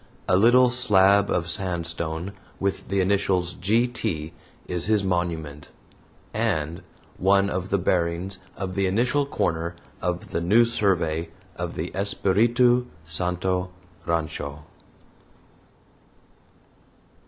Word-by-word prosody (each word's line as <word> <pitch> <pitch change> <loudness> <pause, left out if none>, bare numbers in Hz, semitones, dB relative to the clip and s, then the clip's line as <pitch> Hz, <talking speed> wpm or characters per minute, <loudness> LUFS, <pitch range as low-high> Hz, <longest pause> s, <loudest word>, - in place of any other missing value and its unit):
A 90 - +4
little 120 +5 +5
slab 100 -5 +4
of 85 -1 0
sandstone 85 0 -2 0.3
with 100 0 -2
the 100 0 +1
initials 95 -2 +1
"G. 105 +7 +2
T." 85 -10 -4 0.3
is 90 0 -2
his 105 -2 +2
monument, 85 -5 -2 0.7
and 80 +3 -1 0.4
one 100 +1 +3
of 95 +1 -3
the 100 - +2
bearings 90 +1 -1 0.2
of 95 -1 -4
the 100 0 +1
initial 125 +9 +1
corner 85 -8 -1 0.3
of 90 -1 -3
the 85 - -1
new 105 +8 +5
survey 85 -8 0 0.3
of 85 -1 -5
the 85 +3 -4
"Espiritu 120 +6 +2 0.2
Santo 90 +3 -1 0.4
Rancho." 75 -3 -2
95 Hz, 110 wpm, -24 LUFS, 85-100 Hz, 0.7 s, little